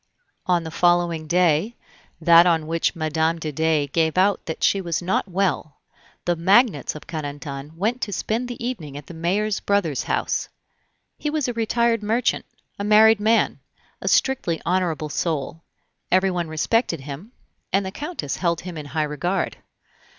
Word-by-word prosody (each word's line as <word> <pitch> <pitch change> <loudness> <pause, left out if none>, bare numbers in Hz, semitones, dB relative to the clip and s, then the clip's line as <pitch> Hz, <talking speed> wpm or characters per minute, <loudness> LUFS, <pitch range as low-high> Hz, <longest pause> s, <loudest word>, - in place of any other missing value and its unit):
On 175 -2 +2
the 160 - -6
following 175 -2 +2
day, 180 +5 +2 0.4
that 170 +1 +7
on 165 -3 +2
which 165 +3 0
Mme. 160 +1 0
de 155 -2 -4
Dey 160 0 +1
gave 160 +3 0
out 195 +2 +3
that 160 - -4
she 195 - +3
was 170 -4 -2
not 185 +3 -1
well, 185 -5 -1 0.5
the 175 - +1
magnates 190 - +3
of 155 - -9
Carentan 145 -1 -6
went 225 +7 -1
to 205 - -2
spend 220 +6 -2
the 240 -1 -6
evening 160 - -5
at 145 - -9
the - - -10
mayor's 195 +6 0
brother's 190 -9 0
house. - - -1 0.7
He 300 - -2
was 300 -3 -1
a 245 - -2
retired 230 0 +1
merchant, 225 +4 0 0.3
a - - -2
married 215 +1 +6
man, 220 +2 +2 0.4
a - - -5
strictly 210 - +2
honorable 170 -4 0
soul; 155 0 -2 0.5
everyone 185 -2 +2
respected 165 - 0
him, 145 - -8 0.4
and 195 0 +1
the 190 - -4
Countess 290 - -4
held 170 -2 0
him 175 -3 -7
in 145 - -8
high 155 +3 -1
regard. 150 +6 -2
175 Hz, 160 wpm, -23 LUFS, 160-205 Hz, 0.7 s, that